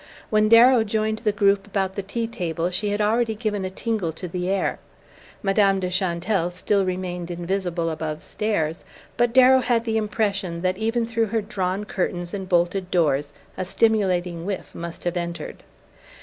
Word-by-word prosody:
When 215 0 +3
Darrow 235 +1 +7
joined 220 0 -1
the 215 -3 +1
group 200 0 +2
about 195 -2 -1
the 200 - -2
tea 230 +4 -3
table 175 -6 -2
she 205 +3 -1
had 205 +1 -1
already 220 +1 +1
given 210 -3 -2
a 185 - -2
tingle 200 -3 -2
to 180 +3 -6
the 180 +1 -3
air. 195 0 0 0.6
Madame 195 -1 +3
de 180 -1 -2
Chantelle 180 0 0
still 195 +3 +1
remained 180 -1 -3
invisible 175 -1 -2
above 155 -1 -4
stairs; 170 -7 -2 0.3
but 240 -1 +2
Darrow 260 +1 +7
had 235 -2 +1
the 225 -1 0
impression 200 -5 -1
that 185 +1 0
even 225 +2 0
through 225 0 0
her 225 +2 0
drawn 195 -1 -2
curtains 175 -3 -3
and 190 -2 -5
bolted 180 +1 +1
doors 145 -5 +1 0.2
a - - -3
stimulating 185 -4 +1
whiff 195 +1 -5
must 170 0 -7
have 175 0 -1
entered. 170 -2 -5
195 Hz, 170 wpm, -23 LUFS, 175-215 Hz, 0.6 s, Darrow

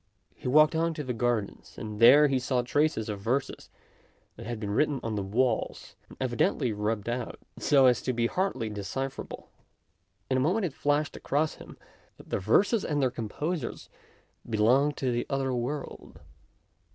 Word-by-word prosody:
He - - -8
walked 155 +4 +5
on 165 0 0
to 150 - -4
the 125 -2 -3
gardens, 115 -3 -2
and 105 -1 -6
there 145 +6 +8
he 135 -2 +1
saw 125 -1 0
traces 145 -3 +1
of 105 -2 -4
verses 130 +7 -2 0.7
that - - -9
had 120 -2 -4
been 105 -2 -4
written 145 +5 +1
on 115 - -2
the 105 - -1
walls, 110 +4 -1
and - - -14
evidently 125 -1 0
rubbed 105 0 -2
out, 120 0 -3 0.2
so 140 -2 +4
as 125 -5 +4
to 130 - -1
be 120 -1 0
hardly 130 - -1
decipherable. 105 +7 -5 0.8
In 130 - +1
a - - +2
moment 185 +9 +1
it 160 - -3
flashed 145 +1 0
across 150 +3 0
him - - -12 0.4
that - - -16
the - - 0
verses 195 - +3
and 150 -2 -1
their 130 -3 +2
composers 130 +6 -4 0.6
belonged 125 +7 +3
to 130 -2 0
the 120 0 -2
other 135 -2 -1
world. 125 +4 -5
130 Hz, 170 wpm, -28 LUFS, 115-145 Hz, 0.8 s, there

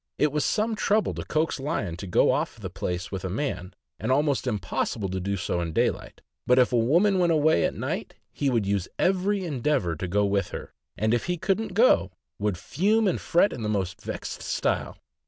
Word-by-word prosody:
It 150 - +2
was 150 0 0
some 220 +1 +1
trouble 215 0 +1
to - - -5
coax 155 -1 -1
Lion 135 - -2
to 95 - -7
go 90 - +4
off - - -2
the 95 -4 -6
place 90 -1 -4
with 95 -3 -4
a 95 - -2
man, 95 -4 -3 0.2
and 110 +6 -1
almost 140 -1 +1
impossible 105 -1 -2
to 95 +1 -2
do 100 +2 -2
so 85 -1 -1
in 85 -2 -3
daylight; - - -1 0.3
but 125 - +5
if 125 -1 +4
a - - +4
woman 170 - +3
went 175 -1 +3
away 155 - +3
at - - -1
night, - - -4 0.2
he 140 - 0
would 115 -5 +1
use 100 -2 0
every 190 +1 +1
endeavor 135 - 0
to 90 +4 -4
go 100 +3 +2
with 100 -2 0
her, - - -7 0.2
and 110 +1 +1
if 120 - 0
he 180 0 -1
couldn't 195 +3 -1
go, 220 - +5 0.3
would 100 -3 0
fume 205 - +1
and 185 - 0
fret 175 +4 +3
in - - -6
the 105 - -2
most 100 -1 -2
vexed - - -6
style. - - -1
120 Hz, 210 wpm, -26 LUFS, -, 0.3 s, but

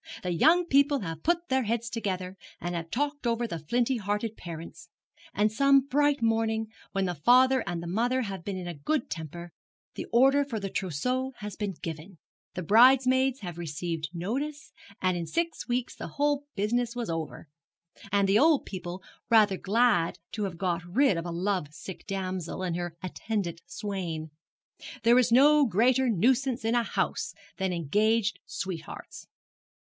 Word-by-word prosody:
The 180 - -1
young 330 - +4
people 280 -2 +3
have 165 -4 -5
put 345 +1 0
their 265 0 +2
heads 230 +2 -1
together, 190 -5 -3 0.2
and 175 0 -4
have 165 -1 -4
talked 285 - -2
over 235 0 0
the 170 -8 -4
flinty 240 - 0
hearted 210 +1 -2
parents; 165 0 -9 0.4
and 210 +2 +1
some 275 +4 +5
bright 285 0 +1
morning, 225 -1 +1 0.2
when 195 -1 0
the 180 - -1
father 255 - +4
and 175 -2 -3
mother 240 +9 0
have 195 -5 -6
been 195 0 -4
in 180 -1 -6
a 175 - -4
good 235 - -2
temper, 170 +2 -6 0.4
the - - -6
order 270 +4 +5
for 245 -6 -4
the 195 -1 -5
trousseau 250 - -2
has 210 -3 -7
been 205 -3 -3
given, 165 +3 -6 0.4
the 180 - -3
bridesmaids 260 +5 +5
have 175 -3 -6
received 165 0 -4
notice, 270 - -4 0.3
and 185 -1 +2
in 170 -1 -4
six 335 - -2
weeks 245 0 -2
the - - -6
whole 290 0 +1
business 235 +4 0
was 235 -7 -3
over, 165 0 -5 0.6
And 200 0 +3
the 200 +2 +4
old 310 -1 +4
people 180 -1 -6 0.3
rather 215 -4 +5
glad 200 -4 +2
to 210 -2 -2
have 180 -4 -5
got 175 -2 -1
rid 210 +6 +2
of 165 +1 -3
a - - -4
love 180 -1 -1
sick 190 +3 -9
damsel 185 -2 -3
and 175 -2 -1
her 175 -1 -4
attendant 185 -3 -3
swain. 175 -7 -4 0.7
There 235 +2 +6
is 250 -1 +2
no 290 +4 +6
greater 245 +6 +3
nuisance 240 +4 +1
in 225 - +2
a 240 - +3
house 230 - -2 0.2
than 190 -1 -1
engaged 210 +7 +1
sweethearts. 175 -4 -7
210 Hz, 165 wpm, -28 LUFS, 175-255 Hz, 0.7 s, There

